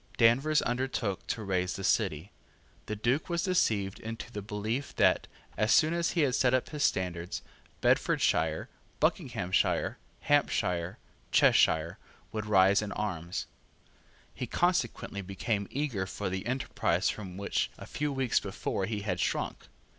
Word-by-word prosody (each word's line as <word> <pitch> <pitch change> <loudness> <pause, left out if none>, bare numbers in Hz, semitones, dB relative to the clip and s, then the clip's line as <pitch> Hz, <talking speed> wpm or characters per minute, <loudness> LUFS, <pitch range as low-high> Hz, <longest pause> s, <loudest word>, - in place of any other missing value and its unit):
Danvers 135 +7 +4
undertook 120 -5 -2
to 110 - -2
raise 90 -2 0
the 95 - -6
City. 80 -1 +1 0.6
The 105 - -2
Duke 125 - 0
was 170 -1 0
deceived 105 - +1
into 115 +2 -7
the 105 - -5
belief 110 +6 -3
that, - - +3 0.3
as 110 +2 +1
soon 155 +4 +5
as 170 0 0
he 145 -6 +3
set 125 0 +3
up 130 - -1
his 150 -2 -2
standard, 90 -2 -1 0.4
Bedfordshire, 80 0 +2 0.3
Buckinghamshire, 90 +1 +1 0.2
Hampshire, 90 -12 +1 0.3
Cheshire 80 +1 +4 0.3
would 105 -1 -4
rise 100 0 +5
in 105 -1 -4
arms. 90 -5 -3 0.9
He - - -5
consequently 150 - 0
became 100 +2 -2
eager 125 -10 -2
for 95 -1 -4
the 95 +4 -3
enterprise 130 +1 0
from 95 -4 -8
which 100 0 -1
a - - -9
few 150 0 -2
weeks 135 -3 +1
before 95 -1 -3
he 105 -1 -3
had 90 -3 -2
shrunk. - - -2
105 Hz, 140 wpm, -30 LUFS, 95-130 Hz, 0.9 s, soon